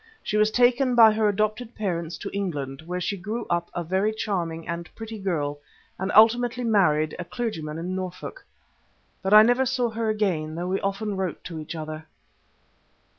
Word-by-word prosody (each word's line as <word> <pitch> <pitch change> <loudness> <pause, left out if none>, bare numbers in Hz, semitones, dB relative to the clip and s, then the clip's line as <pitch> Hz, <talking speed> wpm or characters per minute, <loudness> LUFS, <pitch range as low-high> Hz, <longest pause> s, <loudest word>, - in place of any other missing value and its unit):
She - - -2
was 215 0 +4
taken 245 +2 +3
by 225 -2 +8
her 215 0 +2
adopted 215 +3 -1
parents 170 -5 -3
to - - -6
England, 145 -8 -3
where 180 +1 -2
she 190 +3 -1
grew 210 +6 -4
up 170 0 0
a 175 - -2
very 190 +5 +1
charming 175 -7 -3
and 170 +1 -4
pretty 225 -1 -7
girl, 150 -7 -2 0.4
and 190 +2 -1
ultimately 240 +3 +5
married 155 -9 +2
a - - -2
clergyman 165 -8 -4
in 180 +3 -3
Norfolk. 185 - -6 0.8
But 190 +1 -2
I 215 - +10
never 245 +3 +3
saw 245 -2 0
her 225 0 -1
again, 180 -8 -1
though 175 +2 -3
we 190 - 0
often 200 +1 -2
wrote 190 -2 -3
to 165 -3 -6
each 155 +2 -7
other. 155 0 -6
195 Hz, 175 wpm, -25 LUFS, 170-220 Hz, 0.8 s, I